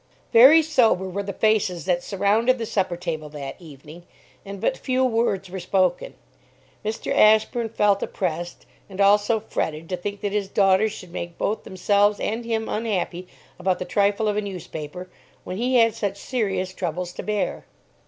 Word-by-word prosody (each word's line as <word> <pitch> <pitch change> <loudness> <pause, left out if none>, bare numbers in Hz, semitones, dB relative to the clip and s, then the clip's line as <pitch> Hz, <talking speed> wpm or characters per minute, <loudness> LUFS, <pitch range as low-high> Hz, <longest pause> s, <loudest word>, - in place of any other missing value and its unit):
Very 275 +8 +8
sober 235 - +2
were 190 +2 -3
the 200 0 -5
faces 210 -4 +1
that 175 -2 +1
surrounded 210 +7 +1
the 230 - -3
supper 185 -5 -1
table 160 -3 -4
that 145 -2 -7
evening; 155 +1 -12 0.4
and 200 0 -8
but - - 0
few 260 - 0
words 225 -5 0
were 190 - -5
spoken. 185 - 0 0.7
Mr. 215 +1 -3
Ashburn 220 +2 +4
felt 205 -2 +2
oppressed, 175 -1 -4 0.2
and 195 0 -10
also 205 +3 +4
fretted 160 -6 -3
to 180 - -2
think 200 +3 -5
that 205 - -2
his 205 -1 -1
daughters 195 +2 +3
should 185 -4 -10
make 170 -1 -6
both 215 - -2
themselves 205 +2 +2
and 225 +3 -3
him 225 -1 -2
unhappy 190 -5 -2 0.3
about 185 0 +1
the 180 - -5
trifle 205 +2 +1
of 210 0 0
a - - +1
newspaper, 180 -3 -7 0.4
when 185 - -6
he 250 +3 0
had 230 -2 +5
such 200 -3 -3
serious 195 -6 -2
troubles 180 0 -4
to - - -6
bear. 210 -2 -3
200 Hz, 170 wpm, -23 LUFS, 180-220 Hz, 0.7 s, Very